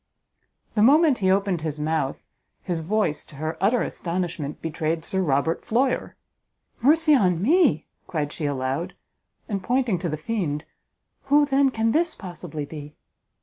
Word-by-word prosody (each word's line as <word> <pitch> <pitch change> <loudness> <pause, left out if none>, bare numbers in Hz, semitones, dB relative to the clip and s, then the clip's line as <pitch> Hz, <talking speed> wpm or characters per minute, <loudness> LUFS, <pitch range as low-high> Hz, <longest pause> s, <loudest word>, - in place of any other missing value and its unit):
The 210 - +1
moment 290 +3 +5
he 190 -2 +2
opened 195 -3 +1
his 155 -1 -4
mouth, 150 -3 -1 0.4
his 175 -3 -2
voice, 170 -4 0
to - - -14
her 155 +3 -3
utter 225 +5 +3
astonishment, 170 -4 -3
betrayed 160 0 -2
Sir 190 - 0
Robert 150 0 0
Floyer! 250 +3 0 0.7
"Mercy 305 +4 +4
on 180 - +3
me," 265 - +3 0.2
cried 150 -3 -2
she 155 - -4
aloud, 140 +6 -2 0.5
and 200 -4 -2
pointing 240 -2 +1
to 175 - -2
the 155 - -3
fiend, 155 -4 -2 0.6
"who, 290 +2 +4
then, 275 -1 +3
can 225 -2 0
this 325 +3 +1
possibly 170 -5 -7
be?" 150 0 -9
180 Hz, 150 wpm, -24 LUFS, 155-235 Hz, 0.7 s, moment